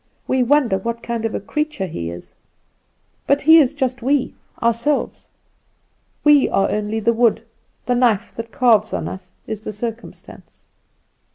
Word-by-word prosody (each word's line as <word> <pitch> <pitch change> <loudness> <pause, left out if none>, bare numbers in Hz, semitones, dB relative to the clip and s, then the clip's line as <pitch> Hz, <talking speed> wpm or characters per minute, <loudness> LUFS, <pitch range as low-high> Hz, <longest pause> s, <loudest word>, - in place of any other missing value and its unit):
We 260 0 +1
wonder 250 -6 +2
what 235 +3 -5
kind 235 -1 -3
of 225 - -2
a - - -1
creature 300 0 -3
he 85 - -5
is; 85 +1 -10 0.9
but 280 0 +2
he 320 +3 +8
is 290 -1 +2
just 260 -3 -2
we, 265 +2 0 0.3
ourselves. 235 +5 -1 0.9
We 295 -2 +5
are 195 - +1
only 210 +1 -2
the 235 +2 +2
wood, 230 -1 +2 0.4
the 250 - +1
knife 240 -5 +1
that 230 0 -6
carves 225 -5 +3
on - - -2
us 185 -1 -9
is 215 -1 -5
the 215 - -6
circumstance. 225 +2 -9
235 Hz, 155 wpm, -20 LUFS, 215-265 Hz, 0.9 s, he